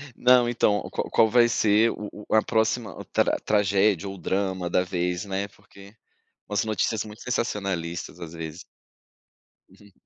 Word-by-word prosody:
Não, 125 -1 +5
então, 110 -3 +2
qual - - -3
qual 110 - +4
vai 120 0 +5
ser 110 0 +3
o 105 0 -8
o - - +2
a 110 - +6
próxima 110 +1 -1
tra - - +2
tragédia 100 -2 +2
ou 95 0 -7
drama 95 -2 -2
da 90 - +2
vez, 90 +1 -2
né, 100 +1 -3
porque 100 +2 -17 0.5
umas 105 0 0
notícias 110 0 -1
muito 105 +1 -11
sensacionalistas, 95 -9 -3
às 85 -1 -7
vezes. 80 0 -7 1.0
Uhum. 100 +1 -19
100 Hz, 150 wpm, -25 LUFS, 95-110 Hz, 1.0 s, a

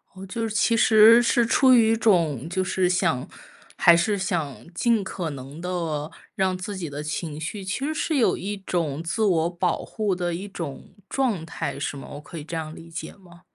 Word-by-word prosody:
哦， 190 - -9
就 225 +4 -3
是 215 - -6
其 230 - +3
实 225 +1 +7
是 240 0 +3
出 260 +3 +5
于 225 -2 +5
一 - - +3
种 165 - +2
就 185 +1 0
是 185 0 +1
想 170 -8 +1 0.5
还 170 - +6
是 200 +5 +1
想 175 - -3
尽 225 +3 +2
可 180 -3 -4
能 140 +2 -8
地 165 -4 -3 0.2
让 190 -1 +1
自 195 +3 -5
己 175 -4 -5
的 145 +1 -6
情 155 0 -4
绪， 190 +6 -5
其 190 +4 -3
实 310 - -1
是 315 0 -1
有 245 - +3
一 205 +2 -4
种 165 -5 -2
自 195 +7 -1
我 170 -5 +2
保 175 -1 -1
护 210 -4 -2
的 175 -1 -2
一 185 +4 -5
种 165 -8 -7
状 235 -12 0
态， 165 - -4
是 - - -3
吗？ 135 - -9
我 145 - -8
可 165 +2 -10
以 150 - -6
这 165 - -6
样 155 -1 -5
理 165 - -12
解 165 +1 -7
吗？ 175 -3 -18
180 Hz, 225 characters per minute, -24 LUFS, 160-210 Hz, 0.5 s, 实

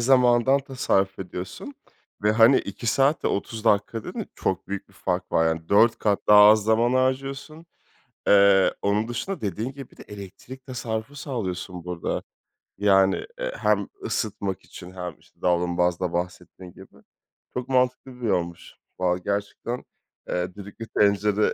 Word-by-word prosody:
zamanından 125 +1 +4
tasarruf 100 -8 0
ediyorsun 90 - -7 0.5
ve 105 +1 +3
hani 115 +4 +6
2 100 +4 -6
saat 135 +6 +2
ve - - +3
30 110 +2 -3
dakika 105 +1 +1
dediğin - - -5
çok - - -2
büyük 100 0 -5
bir 100 - -23
fark 90 -1 -3
var. 80 0 +1
4 115 +3 +5
kat 105 -2 +1
daha 105 0 +9
az 105 0 +7
zaman 115 +3 +3
harcıyorsun. 135 +5 -1 0.6
Eee, 100 -1 +5
onun 105 +2 +1
dışında 120 +12 -4
dediğin 110 +5 -3
gibi, 135 -2 -10
bir - - -21
de - - -11
elektrik 105 +6 -11
tasarrufu 120 0 -5
sağlıyorsun, 95 - -5
burada. 90 -2 -3 0.6
Yani, 95 -1 +3
eee, - - -2
hem - - +1 0.2
ısıtmak 100 - -2
için, 90 0 -11
hem 90 -4 -7
işte - - -27
davlumbazda 90 0 +1
bahsettiğin 90 +1 -5
gibi. 95 - -15 0.6
Çok 125 0 -4
mantıklı 125 0 0
bir 115 - -1
yolmuş. 85 -4 -2 0.2
Vallahi 90 0 +1
gerçekten, 100 +4 -3 0.5
eee, 90 +1 -2
düdüklü 100 +3 -9
tencere, 105 +1 +2
105 Hz, 145 wpm, -25 LUFS, 95-125 Hz, 0.6 s, daha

